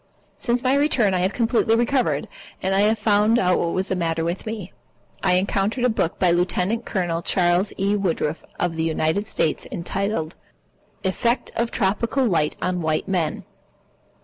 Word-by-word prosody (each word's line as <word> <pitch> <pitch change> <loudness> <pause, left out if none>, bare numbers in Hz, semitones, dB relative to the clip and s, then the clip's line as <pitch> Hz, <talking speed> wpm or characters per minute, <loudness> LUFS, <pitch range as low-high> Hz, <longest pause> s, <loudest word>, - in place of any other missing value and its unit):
Since 240 -1 0
my 255 0 +3
return 270 -8 +2
I 185 - +1
have 185 +2 +1
completely 225 0 +2
recovered. 240 +2 +1 0.3
And 190 +1 0
I 195 - +3
have 215 +2 +3
found 210 +1 +3
out 180 -4 +2
what 170 - -1
was 190 +1 -1
the 190 - 0
matter 165 -2 -1
with 170 +5 -3
me. 215 -4 -5 0.5
I - - +2
encountered 195 +5 0
a 250 - +4
book 175 -7 -1
by 180 -2 +3
Lieutenant 180 +6 0
Colonel 175 -3 -1
Charles 175 +3 +2
E. 200 +1 +1
Woodruff 165 -5 -1 0.2
of 175 -2 -1
the 160 - 0
United 160 +5 0
States 160 -7 -1
Army - - -6
entitled 175 -1 -2 0.7
"Effects 235 +6 0
of 235 0 0
Tropical 230 +6 0
Light 165 -8 +1
on 180 -1 -1
White 155 -1 -1
Men." 175 -5 -1
190 Hz, 175 wpm, -23 LUFS, 175-225 Hz, 0.7 s, a